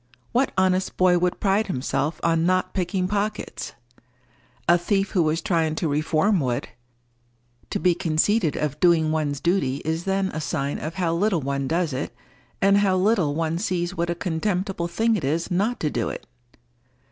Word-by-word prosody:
What 255 +3 +2
honest 185 0 +1
boy 180 -1 +4
would 180 0 0
pride 200 +2 +2
himself 150 0 -2
on 165 -1 +2
not 185 +1 +1
picking 180 0 -1
pockets? 210 +2 -3 0.9
A 175 - +6
thief 195 +3 0
who 185 - +2
was 160 +1 +1
trying 160 -3 +1
to 165 - -1
reform 155 +6 +2
would. 125 -4 -2 1.0
To - - -2
be 180 +2 +3
conceited 165 +2 +1
of 150 -1 -2
doing 165 -3 +4
one's 150 -3 -1
duty 170 -7 +1
is 160 +2 -2
then 195 0 0
a 155 - -4
sign 145 -2 -2
of 160 +3 -5
how 175 -3 0
little 180 -1 +1
one 140 0 -2
does 165 -1 0
it, 130 -2 -4 0.5
and 200 +1 +5
how 195 -2 +2
little 185 -7 +2
one 165 +1 -1
sees 180 -2 -1
what 170 -1 -1
a 175 - 0
contemptible 180 +1 -2
thing 225 +6 +1
it 190 - -3
is 160 +6 -1
not 205 +7 0
to 150 - 0
do 115 - -1
it. - - -7
175 Hz, 175 wpm, -24 LUFS, 155-190 Hz, 1.0 s, A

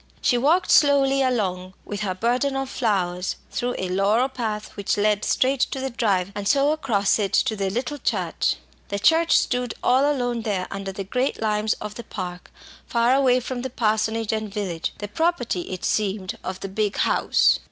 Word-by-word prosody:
She 245 - +2
walked 320 +11 +2
slowly 275 -2 +5
along, 190 -8 -1
with 205 - -5
her 195 -3 -2
burden 250 +7 0
of 270 0 -3
flowers, 185 -6 -1 0.2
through 245 0 -2
a 185 - -2
laurel 205 +7 +2
path 220 -5 -4
which 200 0 -1
led 210 0 +2
straight 265 +1 +1
to 265 - 0
the 265 0 -3
drive, 200 -6 0
and 205 -1 -4
so, 280 +3 +3
across 225 -11 +1
it, 200 -2 0
to 220 - +2
the 195 -2 -1
little 250 +8 -3
church. - - 0 0.3
The 200 - -3
church 325 +10 +4
stood 245 -2 -1
all 270 +4 +4
alone 245 -4 -1
there 200 -5 -2
under 195 0 -4
the 195 +1 -5
great 250 +7 -1
limes 215 0 +1
of 210 -1 -7
the 235 - -8
Park, 180 -4 -7 0.4
far 235 +1 +2
away 260 -2 +4
from 250 0 -5
parsonage 220 -3 0
and 215 -1 -3
village 190 -5 -3
the 205 - -5
property, 245 - -1
it 185 - -4
seemed, 205 0 -1
of 185 0 -5
the - - -4
big 205 +1 -1
house. - - +3
220 Hz, 185 wpm, -23 LUFS, 195-255 Hz, 0.4 s, slowly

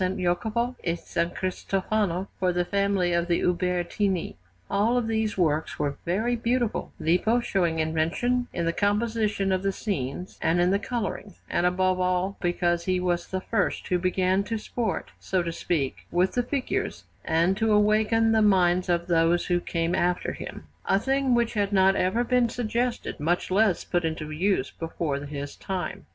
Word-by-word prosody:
Jacopo 220 +7 0
e 170 - +1
S. 170 - -11 0.2
Cristofano 190 0 -1
for 185 -1 +2
the 175 0 0
family 200 -2 +1
of 170 0 +1
the 170 -1 +1
Ubertini. 180 +1 0 0.3
All 220 +5 +2
these 220 -2 -1
works 160 -3 0
were 145 -1 -1
very 220 +8 +1
beautiful, 235 0 -1
Lippo 180 +9 +2
showing 180 -8 0
invention 165 +11 0
in 170 - -2
the 165 - +1
composition 210 -1 0
of 185 0 +1
the 195 0 0
scenes 180 - -4
and 170 +2 +2
in 175 +1 +3
the 200 - +2
colouring, 210 -4 -4
and 175 - +1
above 185 0 +1
all 185 +2 0
because 175 -1 0
he 185 -1 +1
was 175 -1 -1
the 190 0 -3
first 210 0 -1
who 180 - +2
began 185 +1 +1
to 225 +1 -2
sport, 225 +1 -3
so 185 -2 0
to 170 - -3
speak, 155 -5 -2
with 180 +2 +2
the 245 - +1
figures, 285 +11 -2 0.2
and 165 +4 +2
to 220 0 +1
awaken 215 +2 +3
the 220 -1 +4
minds 185 -3 +3
of 170 -1 +1
those 170 0 +2
who 175 -1 +1
came 170 0 -1
after 180 0 0
him; - - -8 0.2
a 195 - +4
thing 270 +3 +1
which 235 -1 +1
had 205 -2 0
not 190 -1 +4
even 190 +6 +1
been 245 -1 +2
suggested, 240 +1 -2
much 175 +5 0
less 200 -1 +3
put 175 -1 -1
into 160 -1 -3
use, 190 +6 0
before 165 -3 -2
his 145 0 -6
time. 190 -2 -5
185 Hz, 170 wpm, -26 LUFS, 175-220 Hz, 0.3 s, the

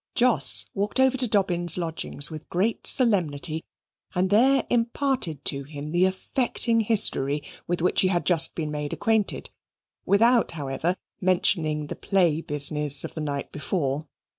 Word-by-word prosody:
Jos 245 -1 +3
walked 205 +5 -2
over 265 0 +3
to 255 -1 +1
Dobbin's 180 -5 +3
lodgings 165 -3 -4
with 155 -1 -9
great 205 +6 -1
solemnity 165 - +2 0.5
and 185 +1 0
there 260 +5 +3
imparted 235 - -1
to 140 0 0
him 145 +1 -8
the 175 +2 +3
affecting 230 +4 -1
history 150 -10 +2 0.2
with 175 -1 -2
which 180 - +2
he 185 - +2
had 175 -2 -1
just 170 -3 +2
been 155 -2 -4
made 150 -1 -4
acquainted, 220 -2 -1 0.5
without, 230 +3 +2
however, 155 +3 -2 0.3
mentioning 165 -5 +1
the - - -7
play 175 -6 0
business 150 -1 +2
of - - -7
the 155 - -6
night 140 -2 -4
before. 150 -1 -3
175 Hz, 145 wpm, -24 LUFS, 150-215 Hz, 0.5 s, Jos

